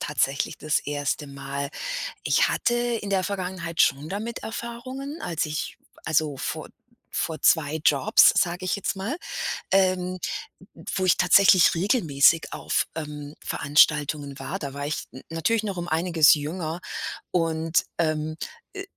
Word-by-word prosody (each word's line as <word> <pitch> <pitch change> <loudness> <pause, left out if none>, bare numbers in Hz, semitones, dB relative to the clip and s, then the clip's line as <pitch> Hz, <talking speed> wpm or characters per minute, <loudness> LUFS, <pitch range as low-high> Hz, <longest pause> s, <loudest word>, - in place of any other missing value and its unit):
tatsächlich 140 -1 -1
das 155 0 0
1. 145 0 -2
Mal. 140 0 -5 0.5
Ich - - +3
hatte 240 - +1
in 240 -3 -1
der 190 -2 +1
Vergangenheit 185 -4 -3
schon 140 +1 +3
damit 215 +5 -4
Erfahrungen, 255 +6 -6
als 165 -2 -1
ich 155 0 -4 0.3
also, 155 -2 +1
vor - - -4 0.4
vor 160 -1 -2
2 155 -1 +3
Jobs, 140 -3 +6
sage 180 +1 0
ich 185 - 0
jetzt 200 - -2
mal, 200 - -3 0.6
ähm, 185 -1 +2
n - - -18 0.6
n - - -14
wo 190 - 0
ich 185 - +4
tatsächlich 190 -3 +6
regelmäßig 165 - +3
auf, - - 0
ähm, 150 -1 -6
Veranstaltungen 145 0 +2
war. 190 - -4
Da 140 -6 -5
war 140 +1 -5
ich 150 - -3
n 130 - -10
natürlich 205 +8 0
noch 200 -3 -4
um 175 - -4
einiges 165 -2 +4
jünger 160 +3 -2 0.5
und, 165 -1 +1
ähm, 155 -1 0 0.4
äh, 390 - -6
165 Hz, 145 wpm, -25 LUFS, 150-190 Hz, 0.6 s, Jobs